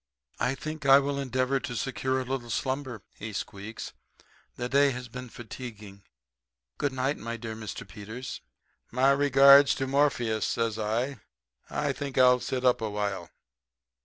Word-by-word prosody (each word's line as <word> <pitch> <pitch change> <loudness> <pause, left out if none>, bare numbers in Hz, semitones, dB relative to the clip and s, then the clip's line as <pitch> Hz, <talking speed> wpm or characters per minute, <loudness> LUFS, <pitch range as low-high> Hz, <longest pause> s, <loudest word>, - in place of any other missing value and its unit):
"'I 130 - +1
think 155 0 -5
I 135 0 +9
will 140 0 0
endeavor 130 0 0
to 125 - -5
secure 130 +1 -1
a 130 - -3
little 125 -2 -4
slumber,' 130 -2 -3 0.2
he 110 0 -6
squeaks. 100 +3 -6 0.6
'The 120 - -3
day 140 +2 +4
has 125 -1 -5
been 125 +1 -8
fatiguing. 110 -4 -9 0.8
Good 145 - 0
night, 130 +2 -1
my 115 +1 -5
dear 115 -1 -6
Mr. 110 -1 -7
Peters.' 110 +5 -7 0.5
"'My 130 +3 +4
regards 140 0 +7
to 135 - -2
Morpheus,' 130 -6 +1
says 115 -2 -1
I. 115 +5 -1 0.5
'I 145 -2 -1
think 140 -1 -6
I'll 125 -1 +6
sit 130 +1 -3
up 125 -2 +4
a 110 - -1
while.' 100 -4 -3
125 Hz, 155 wpm, -28 LUFS, 115-135 Hz, 0.8 s, I